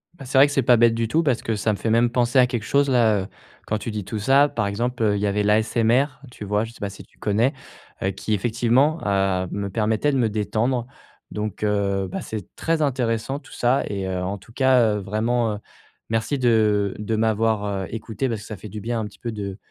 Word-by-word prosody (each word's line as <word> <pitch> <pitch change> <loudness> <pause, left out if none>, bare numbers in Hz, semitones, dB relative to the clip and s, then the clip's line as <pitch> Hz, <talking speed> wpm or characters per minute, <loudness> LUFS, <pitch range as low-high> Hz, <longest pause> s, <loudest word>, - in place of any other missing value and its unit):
Ben, 135 - -11
c'est 130 +1 -1
vrai 140 +2 +8
que 145 - -4
c'est 135 - +2
pas 120 +1 +6
bête 115 0 +4
du 115 -1 0
tout 160 +9 +2
parce 130 -6 +1
que 110 - -1
ça 105 +2 0
me 100 - -2
fait 115 - -2
même 115 +1 +4
penser 120 +2 +2
à 125 - +6
quelque 120 -3 -3
chose 140 0 +2
là, 110 -6 +3
heu, - - -8 0.4
quand 105 - 0
tu 110 - -5
dis 105 -1 -4
tout 110 +4 -5
ça. 140 +6 +4
Par - - -1
exemple, 120 +4 -2
heu, 105 -2 +3
il 100 - -2
y 105 - +1
avait 105 +1 0
l'ASMR, 110 +4 +3 0.3
tu 105 - -9
vois? 105 +2 0
Je 115 - -10
sais - - -17
pas 100 - -3
si 100 - -11
tu - - -29
connais, 110 +6 +1 0.5
heu, 95 - +1
qui 105 +3 -3
effectivement, 120 - +2
heu, 95 -2 +1
me 100 -1 -3
permettait 110 +7 +1
de 135 - 0
me 115 -3 +2
détendre. 115 +4 -1 0.4
Donc, 105 -1 -4
heu, 100 -2 0
bah, - - -4
c'est 110 -4 -7
très 165 -1 0
intéressant 125 -1 0
tout - - -16
ça 125 +3 +2
et 100 -2 -3
heu, 90 -1 -2
en 95 +2 -3
tout 100 - -18
cas, 125 -4 +3
heu, - - -3
vraiment, 110 +3 0
heu, 105 - -4 0.5
merci 115 +5 -1
de 105 -5 +2
de 105 +1 -2
m'avoir, 110 -1 +1 0.2
heu, - - -6
écouté 115 +2 -3
parce 110 -3 -3
que - - -11
ça 105 - -6
fait 105 - -9
du 105 +1 -7
bien 115 +1 -2
un 110 - -2
petit 105 - -12
peu 115 - -4
de 100 -2 -5
110 Hz, 250 wpm, -23 LUFS, 105-120 Hz, 0.5 s, vrai